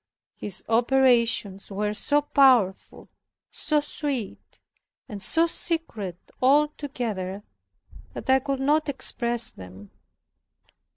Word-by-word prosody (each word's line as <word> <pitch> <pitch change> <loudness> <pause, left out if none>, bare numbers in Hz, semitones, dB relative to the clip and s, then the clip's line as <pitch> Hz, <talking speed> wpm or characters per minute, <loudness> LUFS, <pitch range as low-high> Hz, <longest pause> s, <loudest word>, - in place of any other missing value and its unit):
His 195 -3 -4
operations 235 -4 +2
were 210 +1 -2
so 290 +7 0
powerful, 255 -10 +2 0.4
so 300 -1 0
sweet, 285 -7 -5 0.5
and 205 -2 -8
so 330 - +3
secret, 320 - -3 0.2
all 290 +4 +4
together, 215 -10 -5 0.7
that - - -8
I 265 0 +4
could 270 0 -3
not 300 +2 +1
express 240 -3 +2
them. 95 +2 -13
245 Hz, 100 wpm, -25 LUFS, 205-285 Hz, 0.7 s, all